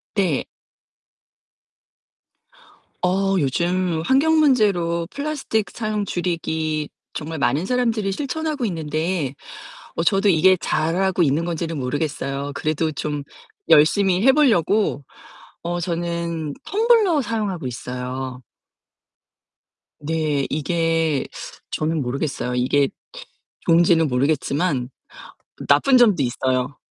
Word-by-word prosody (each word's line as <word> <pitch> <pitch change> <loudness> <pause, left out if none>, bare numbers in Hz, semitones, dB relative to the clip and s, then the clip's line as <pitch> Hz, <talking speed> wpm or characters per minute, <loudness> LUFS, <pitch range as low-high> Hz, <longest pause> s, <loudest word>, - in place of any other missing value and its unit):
네. 195 -4 +1 2.6
어 195 +2 +1
요즘 170 +4 0
환경 280 - +3
문제로 195 - +2
플라스틱 280 -8 -2
사용 215 -2 -2
줄이기 160 -4 -2 0.2
정말 160 +1 -5
많은 140 +3 +1
사람들이 225 -3 0
실천하고 295 +2 -2
있는데 160 -3 -2 0.6
어 165 - 0
저도 195 +2 +3
이게 185 +2 +5
잘하고 175 +4 0
있는 155 +2 +2
건지는 165 -2 -3
모르겠어요. 140 +1 -3
그래도 155 +2 -1
좀 145 0 -3 0.5
열심히 185 +5 +4
해 265 - +8
보려고 215 - +2 0.6
어 175 +1 -2
저는 170 -2 -3
텀블러 425 - +3
사용하고 210 - -3
있어요. 125 +1 -5 1.6
네 150 -2 0
이게 165 -1 0 0.5
저는 155 +1 -1
모르겠어요. 130 0 -3
이게 135 +3 +2 0.8
좋은지는 165 -1 +4
모르겠지만 140 +1 0 0.8
나쁜 275 -3 +5
점도 210 - +4
있어요. 130 +2 -1
165 Hz, 230 characters per minute, -22 LUFS, 145-195 Hz, 2.6 s, 해